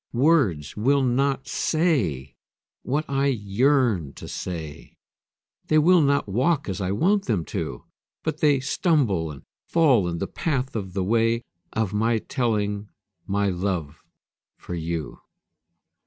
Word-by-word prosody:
Words 120 - +2
will 135 +6 +2
not 135 +2 +1
say 110 - 0 0.5
what 145 +5 -1
I 140 0 +1
yearn 115 - +1
to - - -10
say 80 -5 -7 0.7
They 155 - +3
will 170 +3 +5
not 140 -3 +2
walk 135 - +1
as 95 0 -3
I 95 0 -1
want 195 - +2
them 100 -9 0
to, - - -4 0.4
But - - -2
they 145 -3 +4
stumble 130 - +1
and 70 -2 -10 0.2
fall 135 - +4
in 85 -1 -2
the - - -2
path 135 -5 -2
of 95 -4 -4
the 95 -1 -1
way 115 +3 +2 0.3
Of 110 -3 -1
my 115 +2 +2
telling 105 -4 -1 0.4
my 100 0 +1
love 90 -5 -3 0.6
for - - -8
you. 80 -3 -4
115 Hz, 135 wpm, -24 LUFS, 95-140 Hz, 0.7 s, will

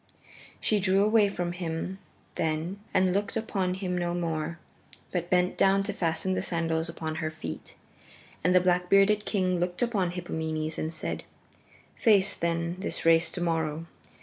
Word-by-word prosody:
She 215 - +1
drew 195 +1 +3
away 215 -1 +4
from 175 -3 -3
him 175 +2 -4 0.3
then 160 +4 -2
and 185 -1 +3
looked 200 +3 -1
upon 190 -5 -1
him 185 -1 -3
no 175 -1 -1
more, 165 -1 -2 0.5
but 175 -1 -2
bent 180 0 +2
down 195 0 +4
to 205 +1 -3
fasten 180 +1 0
the - - 0
sandals 165 -1 -1
upon 160 -1 -4
her 155 - -1
feet. 85 - -8 0.7
And 180 +2 +3
the 180 - +7
black 180 0 +1
bearded 200 +2 +4
king 185 -3 +1
looked 175 +4 -1
upon 205 -7 +1
Hippomenes 160 -3 -3
and 160 - -2
said, 160 - -4 0.7
"Face, 205 -3 +4
then, 170 +1 -1
this 190 - -3
race 165 0 +5
to 175 - -4
morrow. 165 -2 -1
180 Hz, 160 wpm, -28 LUFS, 165-190 Hz, 0.7 s, the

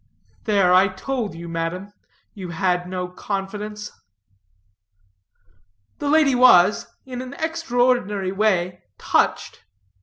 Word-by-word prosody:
"There, 200 -5 +3
I 185 +2 +6
told 210 0 -4
you, 170 +1 -8
madam, 170 +4 -4 0.4
you 185 -4 -8
had 180 0 -1
no 180 -1 -3
confidence." 210 +3 -5 2.1
The 290 - -2
lady 305 -2 +4
was, 215 -6 +5 0.2
in 250 -1 -6
an 255 +2 -8
extraordinary 245 - 0
way, 185 -3 0 0.2
touched. - - 0
200 Hz, 100 wpm, -22 LUFS, 180-245 Hz, 2.1 s, I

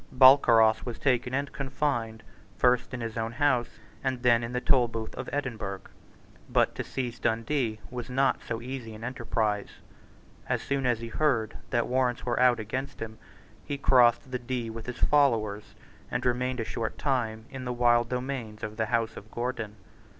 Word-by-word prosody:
Balcarras 125 -4 +6
was 120 -2 -5
taken 125 -2 +1
and 140 +1 -1
confined, 130 -5 -2 0.3
first 125 -1 +3
in 125 -2 -5
his 115 0 -4
own 115 +1 -2
house, 125 -2 +1 0.3
and 130 -2 -1
then 120 -1 +4
in 115 - -4
the 125 - -1
Tolbooth 115 -4 +1
of - - -6
Edinburgh. 110 -9 -3 0.7
But - - +3
to - - -4
seize 120 -2 -4
Dundee 115 0 0
was 125 0 -5
not 135 +1 +2
so 115 0 -5
easy 125 -4 -6
an 110 - -10
enterprise. 110 -4 -1 0.8
As - - 0
soon 140 -2 0
as 120 -2 +1
he 115 - -5
heard 115 -5 +1
that 120 -3 +1
warrants 125 -1 0
were 120 -1 0
out 125 -2 +5
against 130 +6 -4
him, 110 -1 -6 0.4
he 145 -1 -4
crossed 125 -2 +4
the 125 - -2
Dee 120 -2 -3
with 115 +1 -8
his 125 - -5
followers, 115 -8 +2 0.3
and - - -2
remained 125 +1 0
a 115 - -1
short 110 0 -3
time 115 -6 -1
in 130 -1 -6
the 125 - -2
wild 120 -1 +3
domains 125 -4 -4
of 105 0 -5
the 110 -1 0
House 115 0 0
of 105 - -10
Gordon. 120 -3 -3
120 Hz, 175 wpm, -28 LUFS, 115-130 Hz, 0.8 s, Balcarras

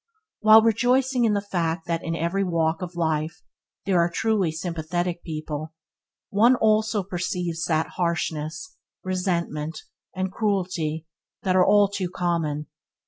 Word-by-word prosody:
While 215 0 +7
rejoicing 245 +3 +2
in 215 - +3
the 200 - +1
fact 165 -2 -1
that 170 -1 -2
in 165 - -2
every 170 +4 0
walk 165 -2 0
in 180 - -3
life 160 +3 -1 0.4
there 190 -3 +2
are 170 0 +3
truly 195 -1 +1
sympathetic 170 +1 -3
people, 155 -1 -5 0.6
one 230 +5 +5
also 215 -2 +2
perceives 175 -2 -3
that 160 -1 +1
harshness, 170 - -2 0.3
resentment, 170 -4 -2 0.3
and 190 0 -2
cruelty 180 -7 -1 0.4
are 185 -1 +4
all 205 +2 +5
too 195 -2 -3
common. 165 -5 -1
175 Hz, 130 wpm, -24 LUFS, 160-200 Hz, 0.6 s, While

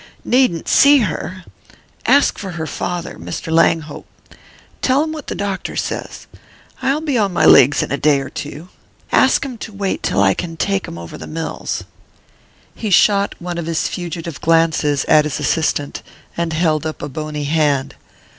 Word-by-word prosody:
"Needn't 245 -10 +2
see 285 +1 +6
her 185 -1 -4 0.6
ask 285 0 +4
for 190 -3 -6
her 160 -2 -4
father, 175 +2 -4
Mr. 160 - -6
Langhope. 160 -2 +1 0.7
Tell 270 +3 +3
him 315 - -3
what 310 -3 -7
the - - -4
doctor 195 -2 -3
says - - -4 0.6
I'll 280 +3 +1
be 285 -6 0
on 200 -3 +1
my 175 - +2
legs 135 +3 +6
in - - -6
a 140 - 0
day 145 -2 +3
or 135 - -6
two 150 +4 -7 0.4
ask - - +3
'em 250 -4 -7
to 215 - -7
wait 200 -1 -3
till - - 0
I 95 -1 +4
can 165 - -5
take 195 +3 -1
'em 85 - -8
over 85 -1 -9
the - - -8
mills." 160 +1 -4 0.9
He 220 - -4
shot 200 +1 +3
one 175 0 -5
of 165 - -5
his 165 -1 0
fugitive 170 -3 -6
glances 160 -3 +2
at 150 - +5
his 150 - -3
assistant, 150 -3 -1 0.3
and 170 -1 -2
held 155 -2 +1
up 155 - -6
a - - -2
bony 150 +1 -5
hand. 145 -2 +1
165 Hz, 175 wpm, -18 LUFS, 150-200 Hz, 0.9 s, see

